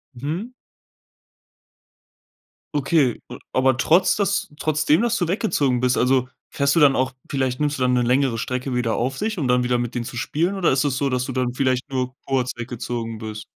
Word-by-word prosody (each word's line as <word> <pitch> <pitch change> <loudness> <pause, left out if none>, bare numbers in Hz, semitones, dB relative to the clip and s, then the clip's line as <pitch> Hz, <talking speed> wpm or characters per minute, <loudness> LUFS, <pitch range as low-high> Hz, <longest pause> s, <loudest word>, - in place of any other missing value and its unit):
Mhm. 160 - -4 2.3
Okay, 140 -3 +1
a 125 - -7 0.2
aber 130 -1 +3
trotz 180 +8 +3
dass 200 -4 0
trotz 155 0 0
dem, 155 +5 +4
dass 235 0 +1
du 175 -3 -1
weggezogen 145 - +1
bist 125 0 +1
also, 130 0 +2 0.2
fährst 140 +1 +1
du 165 - +4
dann 140 -2 +6
auch 130 +1 0 0.2
vielleicht 130 -1 -1
nimmst 145 -1 0
du - - -6
dann 125 0 +2
'ne 125 - +3
längere 125 0 +2
Strecke 125 +2 -3
wieder 120 -2 0
auf 130 +3 -1
sich, 215 0 -2
um 145 -6 -1
dann 125 0 +3
wieder 125 0 +1
mit 120 0 -3
denen 120 - -1
zu 120 - -7
spielen, 165 +8 -1
oder 190 -3 +2
ist 135 - +2
es 140 -3 0
so, 140 0 0
dass 125 -1 0
du 130 - -4
dann 125 -1 -1
vielleicht 130 +1 0
nur 130 -1 -2
kurz 130 -2 0
weggezogen 120 -1 -5
bist? 110 -1 -7
130 Hz, 205 wpm, -22 LUFS, 125-150 Hz, 2.3 s, dann